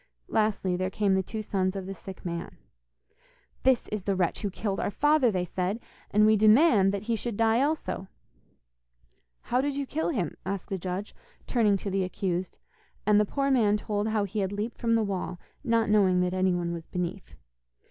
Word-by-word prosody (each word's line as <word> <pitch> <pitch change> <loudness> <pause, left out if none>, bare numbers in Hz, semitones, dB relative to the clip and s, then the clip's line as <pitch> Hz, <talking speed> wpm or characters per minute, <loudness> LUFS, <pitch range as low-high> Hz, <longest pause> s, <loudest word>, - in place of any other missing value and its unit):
Lastly, 210 -4 +1
there 185 +1 -1
came 200 0 +1
the 190 - +3
two 215 +4 -5
sons 190 -2 -1
of 195 -1 -4
the 195 - -5
sick 190 0 -11
man. 170 -1 -5 1.0
'This 260 -2 +3
is 210 -1 -3
the 195 +1 -1
wretch 180 -2 0
who 205 - -1
killed 195 +1 -3
our - - 0
father,' 295 +3 +3
they 185 -4 -1
said, 185 +5 -2 0.3
'and 210 +1 +4
we 215 0 +6
demand 215 - +5
that 200 0 -3
he 230 +1 0
should 225 -1 -4
die 225 +1 +3
also.' 285 -9 -1 1.3
'How 250 +1 0
did 285 0 -1
you 280 0 -2
kill 315 +4 -2
him?' 200 - -2
asked 195 -2 -4
the 195 - -2
judge, 185 +3 -4 0.3
turning 215 -5 +2
to 195 +1 -5
the 195 0 +1
accused, 185 -1 -3 0.5
and 210 0 +5
the 210 - +3
poor 275 +5 0
man 215 -5 +4
told 210 0 -2
how 215 -1 +1
he 200 +2 -3
had 190 -1 -1
leaped 210 +3 -4
from 230 -1 +2
the 225 - +2
wall, 185 -3 -3 0.2
not 230 -3 +2
knowing 195 -4 +4
that 180 0 0
anyone 180 -2 +1
was 165 -1 -7
beneath. 180 -1 -4
205 Hz, 195 wpm, -28 LUFS, 185-225 Hz, 1.3 s, we